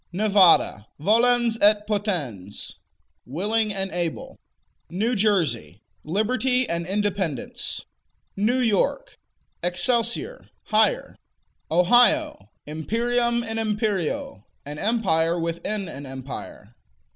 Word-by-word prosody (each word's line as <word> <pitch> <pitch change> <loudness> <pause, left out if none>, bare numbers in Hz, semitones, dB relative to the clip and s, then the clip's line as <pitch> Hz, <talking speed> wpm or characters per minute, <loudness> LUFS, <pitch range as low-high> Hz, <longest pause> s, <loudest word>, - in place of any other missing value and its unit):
Nevada 185 - +4
Volens 230 +5 +3
et 210 0 +4
potens: 165 - -3 0.4
Willing 210 - -1
and 195 -1 -3
able. 170 -2 -3 0.5
New 220 +8 -1
Jersey 145 - 0 0.2
Liberty 250 - 0
and 170 0 -2
Independence. 195 - -2 0.5
New 215 +6 +1
York 250 - 0 0.4
Excelsior: 235 - 0
Higher. - - +1 0.5
Ohio 245 - +3 0.2
Imperium 235 +9 -1
in 225 -1 -4
imperio: 210 - -2 0.2
An 145 +1 -6
empire 175 -7 +1
within 170 +5 -3
an 140 -3 -8
empire. 130 0 -9
205 Hz, 85 wpm, -24 LUFS, 165-230 Hz, 0.5 s, Nevada